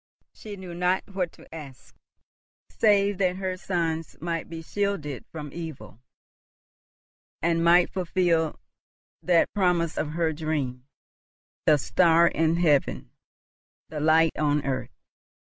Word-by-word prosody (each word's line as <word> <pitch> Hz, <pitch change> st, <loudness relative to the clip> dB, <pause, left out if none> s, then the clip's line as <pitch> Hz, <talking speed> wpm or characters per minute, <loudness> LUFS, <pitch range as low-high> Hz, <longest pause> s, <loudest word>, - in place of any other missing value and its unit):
She 210 Hz, -2 st, -9 dB
knew 185 Hz, -3 st, -9 dB
not 180 Hz, +2 st, +1 dB
what 180 Hz, -3 st, -1 dB
to -, -, -17 dB
ask, 145 Hz, -5 st, -11 dB, 0.8 s
save 205 Hz, -2 st, +3 dB
that 185 Hz, -2 st, +2 dB
her 185 Hz, -1 st, -3 dB
sons 165 Hz, -3 st, -3 dB
might 165 Hz, 0 st, -3 dB
be 165 Hz, -1 st, -7 dB
shielded 195 Hz, -8 st, -3 dB
from 150 Hz, -3 st, -7 dB
evil, 140 Hz, -10 st, -8 dB, 1.4 s
and 165 Hz, 0 st, +1 dB
might 175 Hz, +1 st, +5 dB
fulfil 175 Hz, -3 st, 0 dB, 0.6 s
that 175 Hz, -2 st, +2 dB
promise 180 Hz, -5 st, +1 dB
of 150 Hz, 0 st, -2 dB
her 165 Hz, -1 st, 0 dB
dream, 145 Hz, -5 st, -3 dB, 0.8 s
the 150 Hz, -, +6 dB
star 170 Hz, +4 st, +4 dB
in 165 Hz, 0 st, +1 dB
heaven, 155 Hz, -5 st, +1 dB, 0.8 s
the 155 Hz, -, -5 dB
light 160 Hz, +2 st, +4 dB
on 150 Hz, -1 st, +1 dB
earth. 130 Hz, -1 st, -2 dB
165 Hz, 120 wpm, -26 LUFS, 155-180 Hz, 1.4 s, the